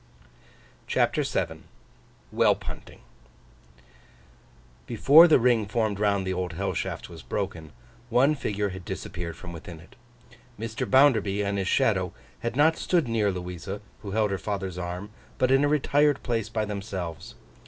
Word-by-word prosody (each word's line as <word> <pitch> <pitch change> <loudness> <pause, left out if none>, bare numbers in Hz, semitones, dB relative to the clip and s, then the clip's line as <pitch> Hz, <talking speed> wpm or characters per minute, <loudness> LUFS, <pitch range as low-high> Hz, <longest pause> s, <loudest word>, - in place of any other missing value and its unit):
CHAPTER - - +1
VII - - -2 0.7
WHELP - - +2
HUNTING - - -9 1.9
BEFORE 145 +8 +7
the 160 - +6
ring 115 -4 +2
formed 110 -2 -1
round 100 -2 +1
the 95 - -1
Old 90 -2 -3
Hell 95 +4 -2
Shaft - - -4
was - - -11
broken, 80 -2 -4 0.4
one 130 +5 +4
figure 105 -7 -2
had 95 -1 -8
disappeared 85 0 -6
from 85 -1 -9
within 85 0 -9
it. 90 +10 -17 0.6
Mr. 115 0 -4
Bounderby 110 -7 +4
and 100 0 -1
his 95 - -2
shadow - - +1 0.3
had 120 +1 -3
not 155 +3 +4
stood 170 -7 +1
near 110 -3 +1
Louisa, 90 +2 -6 0.2
who 100 - -7
held 105 0 +1
her 95 - -2
father's 95 -1 -4
arm, 90 +3 -5 0.3
but 130 0 +2
in 135 +1 +5
a - - +4
retired 145 -1 +2
place 115 -4 -1
by 110 -1 -1
themselves. 100 -5 -6
105 Hz, 150 wpm, -26 LUFS, 95-120 Hz, 1.9 s, BEFORE